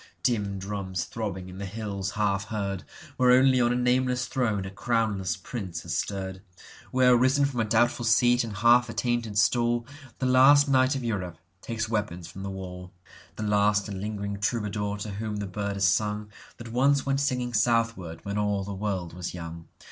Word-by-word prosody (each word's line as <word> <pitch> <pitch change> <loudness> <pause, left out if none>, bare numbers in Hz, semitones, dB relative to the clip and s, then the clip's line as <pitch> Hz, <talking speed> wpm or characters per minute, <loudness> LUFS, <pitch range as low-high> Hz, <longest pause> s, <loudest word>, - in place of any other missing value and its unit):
Dim 105 -5 0
drums 95 -2 -3
throbbing, 95 -5 -5
in 95 +1 -9
the 100 - -4
hills 100 -1 -4
half 100 -1 +1
heard, 100 -3 -3 0.3
Where 125 -1 +4
only 130 0 +5
on 120 0 +3
a - - +1
nameless 125 0 +1
throne 110 -6 -1
a 95 - -6
crownless 105 -5 -1
prince 95 -9 -6
has 85 0 -3
stirred, 95 +1 -3 0.5
Where, 125 -1 +5
risen 130 +3 +3
from 135 -4 -2
a 110 - +2
doubtful 120 +2 +2
seat 120 +2 +4
and 115 - -5
half 120 +2 +5
attainted 115 -2 -1
stall, 120 +2 +2 0.3
The 130 - -2
last 135 +3 +6
knight 130 0 +3
of 135 - -3
Europe 95 -7 -3 0.2
takes 115 -1 -3
weapons 105 -6 -3
from 95 - -9
the 100 - -4
wall, 90 -1 -7 0.4
The 110 - -5
last 105 0 +2
and 100 -2 -5
lingering 100 -1 -4
troubadour 105 -1 -1
to 105 +1 -5
whom 105 +1 -4
the 105 -1 -3
bird 100 +1 -3
has 100 -1 +2
sung, 105 +2 0 0.3
That 115 -1 -9
once 135 +3 +3
went 135 0 +1
singing 125 -3 -1
southward 115 -7 0
when 100 +1 -2
all 105 -1 0
the 100 +1 -5
world 95 -4 -3
was 90 0 -5
young. 85 -1 -8
105 Hz, 185 wpm, -27 LUFS, 100-120 Hz, 0.5 s, last